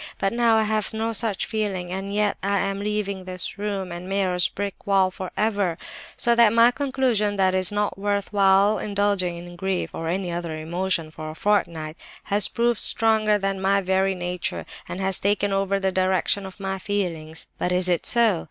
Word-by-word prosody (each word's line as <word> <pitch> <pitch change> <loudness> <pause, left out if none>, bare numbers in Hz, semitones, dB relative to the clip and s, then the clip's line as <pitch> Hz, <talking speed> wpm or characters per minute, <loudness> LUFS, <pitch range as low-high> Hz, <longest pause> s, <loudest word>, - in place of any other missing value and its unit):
But 195 +2 0
now 235 -1 +3
I 220 - +3
have 215 0 -1
no 225 +1 -1
such 205 -3 0
feeling, 195 -4 -3
and 195 +1 -4
yet 210 0 +1
I 200 +1 +1
am 195 0 -1
leaving 200 -2 -2
this 185 +1 -6
room 200 -3 -3
and 175 +2 -7
Meyer's 185 -2 +2
brick 200 0 -6
wall 190 -2 +3
for 185 0 -6
ever. 205 -6 0 0.4
So 235 - +4
that 235 -2 +5
my 230 +2 +6
conclusion, 255 -7 0
that 190 -1 +2
it 185 - +2
is 185 - +3
not 205 -1 -1
worth 200 0 -1
while 200 +1 +4
indulging 200 -4 0
in 175 0 -10
grief, 190 0 -2
or 165 - -4
any 180 +1 -2
other 170 -2 -4
emotion, 170 0 -2
for 155 0 -7
a 155 - -8
fortnight, 170 -5 0 0.3
has 205 0 +2
proved 235 -1 0
stronger 220 -2 +2
than 195 -1 -2
my 195 +1 +3
very 190 0 +1
nature, 180 0 -4 0.2
and 180 - -5
has 190 -1 +1
taken 205 0 +1
over 195 0 +1
the 190 -1 0
direction 190 +1 +1
of 190 - -12
my 195 -1 -3
feelings. 170 -6 -3
But 180 - 0
is 180 0 +2
it 175 -2 +1
so? 230 -7 +3
195 Hz, 195 wpm, -24 LUFS, 185-210 Hz, 0.4 s, my